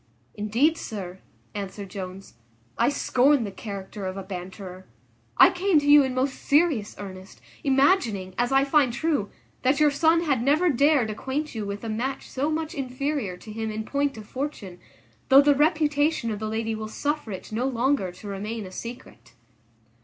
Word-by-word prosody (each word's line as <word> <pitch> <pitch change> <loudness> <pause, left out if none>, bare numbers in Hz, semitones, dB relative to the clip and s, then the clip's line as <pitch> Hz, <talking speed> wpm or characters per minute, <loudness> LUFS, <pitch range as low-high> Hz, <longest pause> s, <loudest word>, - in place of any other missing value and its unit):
"Indeed, 235 +11 +1
sir," 190 -4 -6 0.3
answered 200 -1 -6
Jones, 190 0 -7 0.4
"I 235 - +3
scorn 280 -1 +3
the 205 - -4
character 195 -1 -7
of 185 +1 -5
a 195 - -5
banterer. 185 0 -8 0.5
I - - +8
came 370 -1 +2
to 290 - -5
you 290 0 +8
in 260 -2 -1
most 265 +1 -1
serious 285 -8 +2
earnest, 190 -1 -10 0.2
imagining, 265 - +2
as 245 +4 0
I 270 0 +4
find 275 -2 +3
true, 250 -3 -1 0.3
that 270 +3 +2
your 300 -1 +5
son 320 +4 +3
had 275 -7 +1
never 305 +7 +3
dared 280 -4 +3
acquaint 270 +7 -3
you 215 -3 -4
with 200 +2 -5
a - - -4
match 250 +5 -3
so 280 +3 -1
much 315 0 -2
inferior 270 -6 -3
to 215 - -11
him 220 +1 -3
in 215 0 -4
point 280 -1 -1
of 215 -1 -10
fortune, 235 -10 -5 0.5
though 270 0 +9
the 290 0 +6
reputation 295 -3 +2
of 210 - -4
the 215 - -3
lady 225 +1 -2
will 215 0 -5
suffer 290 0 -2
it 190 - -8
no 235 +4 -1
longer 255 -5 0
to 180 +4 -12
remain 210 +2 -4
a 185 - -9
secret." 185 - -9
240 Hz, 175 wpm, -25 LUFS, 205-285 Hz, 0.5 s, though